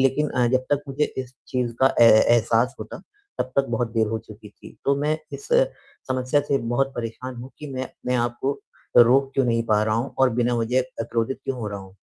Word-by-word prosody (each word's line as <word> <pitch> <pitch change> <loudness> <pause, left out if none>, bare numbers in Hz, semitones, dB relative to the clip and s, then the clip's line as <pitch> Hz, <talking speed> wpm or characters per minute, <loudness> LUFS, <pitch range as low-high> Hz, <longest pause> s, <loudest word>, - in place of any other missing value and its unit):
लेकिन 135 +3 +2
अ, 125 -1 +2
जब 130 +1 +1
तक 145 0 +2
मुझे 140 +2 0
इस 130 -1 -5
चीज़ 125 -2 -1
का 135 0 +4
ए - - +10
ए 110 - +7
एहसास 115 +1 +2
होता, - - -7 0.4
तब 130 - -2
तक 135 - +3
बहुत 115 -1 -1
देर 110 -1 +2
हो 110 +1 -2
चुकी 110 -1 -13
थी। - - -15
तो 140 0 +3
मैं 155 +2 0
इस 425 - -8 0.6
समस्या 130 +2 +1
से 140 -1 0
बहुत 130 +3 -1
परेशान 120 +2 -5
हूँ 125 +2 -9
कि 150 - -8
मैं 130 0 -3
अपने 125 0 -5
आप 120 0 -8
को 140 +1 -1 0.4
रोक 130 +3 +6
क्यों 135 - +2
नहीं 115 -1 +1
पा 105 -1 +3
रहा 110 0 +1
हूँ 120 +4 -3
और 130 -1 +4
बिना 120 0 +2
वजह 115 +3 +1
अ, 130 -2 -5
क्रोधित 115 +2 -2
क्यों 130 -1 -3
हो 110 - -3
रहा 100 -1 -5
हूँ। 95 -1 -14
125 Hz, 235 wpm, -23 LUFS, 115-135 Hz, 0.6 s, ए